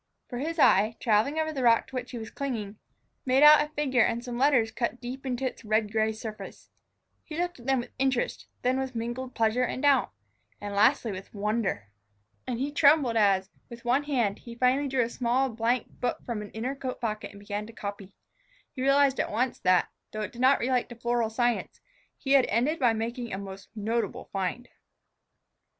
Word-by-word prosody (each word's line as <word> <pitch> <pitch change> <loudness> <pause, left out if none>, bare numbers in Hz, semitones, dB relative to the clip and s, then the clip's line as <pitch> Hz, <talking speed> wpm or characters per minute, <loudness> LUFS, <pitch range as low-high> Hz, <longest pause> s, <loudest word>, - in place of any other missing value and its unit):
For 245 - -5
his 325 +5 -3
eye, 215 -6 +4
traveling 230 +6 +2
over 315 0 0
the 270 - -3
rock 230 -2 +4
to 265 - -12
which 250 0 -4
he 245 - -6
was 220 -1 -7
clinging, 220 -7 -4 0.4
made 260 +2 +3
out 300 0 +9
a 300 - -7
figure 265 -4 +2
and 230 +2 +1
some 245 -1 -5
letters 255 -5 +3
cut 235 +1 -2
deep 255 +2 -7
into 255 +1 -2
its 255 - -4
red 215 -1 +1
gray 220 0 +1
surface. 220 0 -9 0.5
He 305 - -8
looked 350 -3 -2
at 240 - -12
them 265 -2 +2
with - - -11
interest, 265 -2 0 0.2
then 255 +1 +2
with 265 -2 -4
mingled 240 +3 -4
pleasure 225 +2 +2
and 250 +1 -2
doubt, 280 -3 +4 0.5
and 205 0 -6
lastly 220 +3 +3
with 190 0 -8
wonder. 205 - -2 0.6
And 250 -2 -2
he 275 +4 -2
trembled 285 -4 +4
as, 195 -3 +3 0.2
with 235 0 -11
one 260 +4 +2
hand, 240 -9 0
he 235 -1 -10
finally 255 +4 +2
drew 260 -2 +1
a - - -1
small 255 +3 +1
blank 230 +1 0 0.2
book 245 - -2
from 230 -3 -3
an 210 - -8
inner 240 +5 -3
coat 265 -2 -5
pocket 215 -3 -3
and 200 - -13
began 205 +1 -5
to 230 - -12
copy. 200 -2 -7 0.6
He 255 - -7
realized 275 0 +3
at - - 0
once 245 +4 -1
that, 185 -1 +3 0.2
though 215 - -3
it 210 - -4
did 240 - -8
not 260 +2 +5
relate 250 0 0
to 240 - -9
floral 235 -1 0
science, 240 +1 -1 0.4
he 270 - -4
had 275 -2 +6
ended 255 +9 +1
by 245 -4 +4
making 235 +2 -4
a 190 - -3
most 195 0 -9
notable 225 +2 -2
find. 195 +6 -2
240 Hz, 200 wpm, -28 LUFS, 220-265 Hz, 0.6 s, out